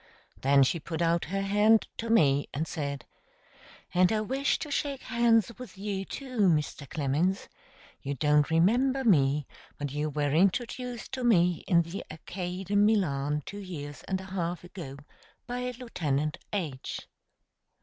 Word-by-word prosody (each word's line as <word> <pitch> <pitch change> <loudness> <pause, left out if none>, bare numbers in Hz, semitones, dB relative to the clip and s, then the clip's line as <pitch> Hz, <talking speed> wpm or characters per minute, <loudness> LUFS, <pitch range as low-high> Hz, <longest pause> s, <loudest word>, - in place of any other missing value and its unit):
Then 140 +1 +5
she 165 +6 +1
put 160 +1 -5
out 170 0 +2
her 195 +4 -2
hand 210 +3 +4
to 230 - -4
me, 145 -11 +4
and 160 +3 -1
said: 140 -3 -4 0.9
"And 180 +1 +4
I 215 -1 +1
wish 265 +6 0
to 300 - -6
shake 280 -1 -2
hands 235 -1 +3
with 250 -5 -10
you 195 -1 -3
too, 255 0 -6
Mr. 150 -3 -1
Clemens. 155 +6 0 0.5
You 140 +1 -3
don't 150 +2 +3
remember 245 +12 +3
me, 145 - +3 0.3
but 145 -2 -4
you 150 +2 -1
were 145 -1 0
introduced 235 +7 0
to 260 -2 -3
me 180 -7 +3
in 170 -4 +4
the 170 +4 -6
arcade 180 +4 -6
in 205 0 +5
Milan 150 -9 +1
two 205 - -7
years 145 -7 -7
and 190 -1 -1
a - - -8
half 175 -2 -2
ago 170 -6 -8 0.5
by 250 0 -3
Lieutenant 155 - -2
H." 155 -10 -3
180 Hz, 150 wpm, -29 LUFS, 150-220 Hz, 0.9 s, Then